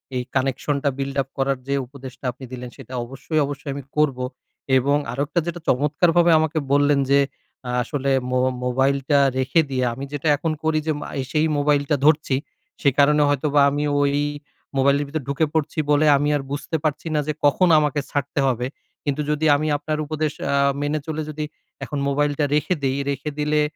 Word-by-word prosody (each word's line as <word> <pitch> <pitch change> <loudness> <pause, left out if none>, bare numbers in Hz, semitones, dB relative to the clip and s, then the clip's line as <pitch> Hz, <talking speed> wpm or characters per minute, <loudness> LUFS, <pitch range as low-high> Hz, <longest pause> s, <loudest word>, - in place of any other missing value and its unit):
এই 125 - -1
কানেকশনটা 135 +2 0
build-up 135 -1 -2
করার 135 -1 +1
যে 140 - 0
উপদেশটা 135 0 -11
আপনি 130 +2 -11
দিলেন, 125 -1 -6
সেটা 130 -2 -11
অবশ্যই, 135 +5 -3
অবশ্যই 145 0 -5
আমি 140 - -6
করবো। 135 -4 +2 0.5
এবং 140 +3 +2 0.2
আরেকটা 145 +6 0
যেটা 175 0 -3
চমৎকারভাবে 165 +5 +3
আমাকে 160 0 -1
বললেন 145 0 +4
যে, 140 - +6 0.5
আ - - -3
আসলে 140 +1 -2 0.2
মো 130 - +2 0.3
মোবাইলটা 135 +3 +2 0.2
রেখে 130 +5 +3
দি। 130 - -3 0.2
আমি 135 +3 -6
যেটা 145 +2 -2
এখন 165 +2 -1
করি 160 0 +2
যে - - +3
মা - - -6 0.2
এসেই 155 +4 0
মোবাইলটা 145 0 +2
ধরছি। 150 -3 +3 0.5
সে 140 - +5
কারণে 150 +1 +5
হয়তোবা 145 0 +2
আমি 145 +1 -1 0.2
ওই 140 0 +2 0.6
মোবাইলের 140 +2 +3
ভিতর 155 +1 -3
ঢুকে 140 +3 +1
পড়ছি 160 0 -1
বলে 145 +1 +4
আমি 145 +1 0
আর 145 - 0
বুঝতে 145 +4 -3
পারছি 155 +2 -1
না 150 - +3
যে, 155 - 0
কখন 180 +6 +4
আমাকে 150 -1 0
ছাড়তে 145 0 -2
হবে? 125 -1 0 0.4
কিন্তু 145 +1 0
যদি 150 +1 0
আমি 155 +2 -1
আপনার 150 +1 -3
উপদেশ 155 0 -1 0.2
আ - - +3 0.3
মেনে 150 +1 0
চলে 155 0 -2
যদি 150 0 -4 0.4
এখন 145 - -4
মোবাইলটা 145 +1 +1
রেখে 150 +4 +1
দেই, 135 +1 +1
রেখে 140 +2 -2
দিলে 150 0 +2
145 Hz, 175 wpm, -22 LUFS, 135-150 Hz, 0.6 s, যে